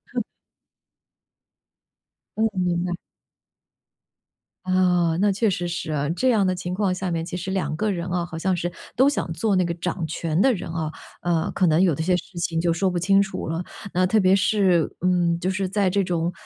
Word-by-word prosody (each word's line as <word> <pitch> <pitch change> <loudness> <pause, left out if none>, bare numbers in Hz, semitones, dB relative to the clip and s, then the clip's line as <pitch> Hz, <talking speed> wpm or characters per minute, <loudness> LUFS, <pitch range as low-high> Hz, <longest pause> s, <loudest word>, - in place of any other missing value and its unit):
嗯。 - - +1 2.1
嗯， 225 - +3
明 175 -2 0
白。 175 -1 -2 1.7
啊， 180 -3 +2
那 205 0 +4
确 215 +3 +1
实 175 -2 -2
是 175 -2 -4
啊。 145 0 -1
这 215 +10 +1
样 215 -5 +3
的 185 - +2
情 180 0 -4
况 190 -1 +1
下 185 0 -3
面， 165 -1 -2
其 180 +1 -5
实 190 +2 -4
2 190 -5 -1
个 215 +5 0
人 175 -2 -3
啊， 175 -1 -1
好 165 -1 -7
像 185 +2 0
是 175 0 -2 0.2
都 260 +3 +5
想 280 -11 -1
做 205 +4 +1
那 185 - +3
个 170 -1 -1
掌 175 0 -3
权 160 0 -2
的 265 - +5
人 180 - -5
啊， 160 -2 -3 0.3
呃， 170 -2 0
可 185 - +2
能 160 +2 +3
有 175 -6 +3
的 160 - -2
些 180 +2 +2
事 180 0 -10
情 170 -1 -1
就 170 0 +2
说 190 +3 +1
不 180 -1 -1
清 195 +3 +4
楚 195 -1 -3
了。 165 +2 -2 0.3
那 185 +1 +3
特 215 +4 +3
别 190 -1 +5
是， 190 -4 +2
嗯， 175 -2 +2
就 180 - -1
是 190 0 -1
在 200 -1 +1
这 200 +2 +1
种， 175 -1 -1
180 Hz, 215 characters per minute, -23 LUFS, 170-190 Hz, 2.1 s, 都